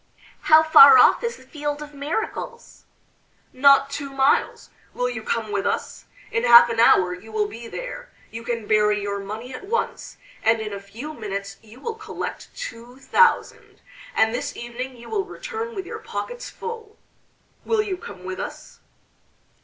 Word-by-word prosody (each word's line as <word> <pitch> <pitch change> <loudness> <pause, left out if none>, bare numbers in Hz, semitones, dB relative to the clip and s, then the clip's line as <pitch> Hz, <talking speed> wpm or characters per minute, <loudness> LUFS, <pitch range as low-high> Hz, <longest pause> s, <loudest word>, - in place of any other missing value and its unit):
"How 315 0 +8
far 435 +7 +9
off - - +5
is 470 0 -3
the - - -16
Field 295 -2 -4
of 295 0 -12
Miracles?" 435 - -5 0.7
"Not 275 +1 +5
two 280 0 -5
miles. 270 +1 +1 0.2
Will 250 - 0
you 240 -3 -5
come 220 -1 -3
with 200 -1 -1
us? - - -3 0.3
In 230 - -1
half 240 0 +8
an 230 - -3
hour 185 -5 +5
you 195 +5 -11
will 215 -1 0
be 230 +3 -9
there. - - -7 0.2
You 230 +1 -7
can 230 -2 -3
bury 210 0 +2
your 200 0 -3
money 220 +6 -7
at 255 - -8
once, 465 +2 -3 0.2
and 225 0 +3
in 215 -1 -5
a 200 - -5
few 225 +10 -9
minutes 200 -5 -6
you 225 +3 -16
will 455 +11 -4
collect 435 0 -7
two 245 - -8
thousand, 470 - +1 0.3
and 220 0 +3
this 285 +4 -4
evening 245 +2 -6
you 235 - -13
will 415 -3 -1
return 455 +3 -6
with 380 -2 -5
your - - -7
pockets 485 0 -6
full. 450 -2 -8 0.7
Will 445 -2 +1
you 400 -3 -3
come 200 - -11
with 185 0 -6
us?" - - -8
250 Hz, 170 wpm, -23 LUFS, -, 0.7 s, far